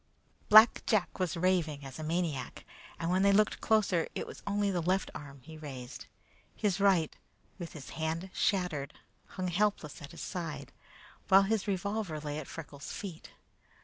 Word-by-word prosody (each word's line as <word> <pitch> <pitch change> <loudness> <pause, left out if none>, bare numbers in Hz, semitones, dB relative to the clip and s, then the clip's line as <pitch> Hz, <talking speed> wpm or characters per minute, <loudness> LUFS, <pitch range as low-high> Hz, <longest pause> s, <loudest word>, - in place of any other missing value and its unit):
Black 215 +2 +8
Jack 205 -4 +1
was 180 -2 -1
raving 165 -5 +1
as 135 +2 -8
a - - -4
maniac, 160 -4 -2 0.3
and 165 +1 -1
when 185 +1 +3
they 200 0 +5
looked 210 +2 +3
closer 205 -6 +2
it - - -2
was - - -10
only 200 0 +1
the 180 -2 0
left 185 +3 0
arm 140 -2 -9
that - - -25
he 160 -1 -10
raised. 135 -3 -8 0.5
His 200 -3 0
right, 190 -6 +3 0.4
with 170 -2 -6
the 145 -4 -9
hand 165 +4 -3
shattered, 175 -8 0 0.3
hung 185 -1 -3
helpless 180 -4 0
at 145 - -8
his 170 - -10
side, 155 -7 -5 0.6
while 195 +1 +7
his 215 +1 0
revolver 200 -3 -2
lay 150 0 -4
at 150 - -7
Freckles' 145 -3 -8
feet. 185 -6 -7
175 Hz, 170 wpm, -31 LUFS, 155-195 Hz, 0.6 s, Black